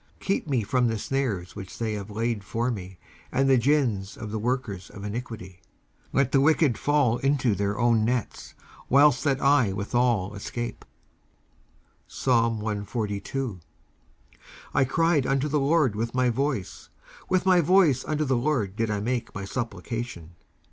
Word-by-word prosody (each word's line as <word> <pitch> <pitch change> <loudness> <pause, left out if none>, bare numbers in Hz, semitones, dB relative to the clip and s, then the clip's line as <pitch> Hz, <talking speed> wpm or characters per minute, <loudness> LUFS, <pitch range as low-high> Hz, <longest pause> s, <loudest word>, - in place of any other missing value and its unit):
19:141:009 - - -14
Keep 195 -4 0
me 130 -6 +1
from 125 +3 +1
the 115 -1 -1
snares 105 -7 -2
which 95 -2 -8
they 110 -2 -2
have 100 -1 -5
laid 110 0 -2
for 115 +5 -1
me, 95 -4 -7 0.3
and 135 +1 +2
the 135 - +5
gins 120 -7 +1
of 105 - -7
the 110 - -2
workers 120 -5 -2
of 100 - -10
iniquity. 105 -4 -6 0.5
19:141:010 - - -34
Let 135 -2 +2
the 135 - +4
wicked 150 -3 +3
fall 140 -5 +2
into 135 -4 +2
their 100 +1 -1
own 120 -2 +3
nets, 120 0 -3 0.3
whilst 140 0 +5
that 140 -2 +2
I 140 -7 +4
withal 105 -1 0
escape. 120 +3 -5 1.2
19:142:001 110 -1 -1 1.1
I 135 - +3
cried 160 0 +2
unto 135 +2 +1
the 150 0 +1
LORD 140 -5 +2
with 115 +3 -3
my 125 -1 +3
voice; 130 -5 -3 0.4
with 185 0 +2
my 185 -2 +5
voice 165 -6 +4
unto 155 0 -1
the 130 -1 +1
LORD 120 -7 0
did 115 0 -1
I 105 -1 -1
make 120 +3 -3
my 100 -1 -4
supplication. 115 -5 -5
120 Hz, 155 wpm, -26 LUFS, 105-135 Hz, 1.2 s, the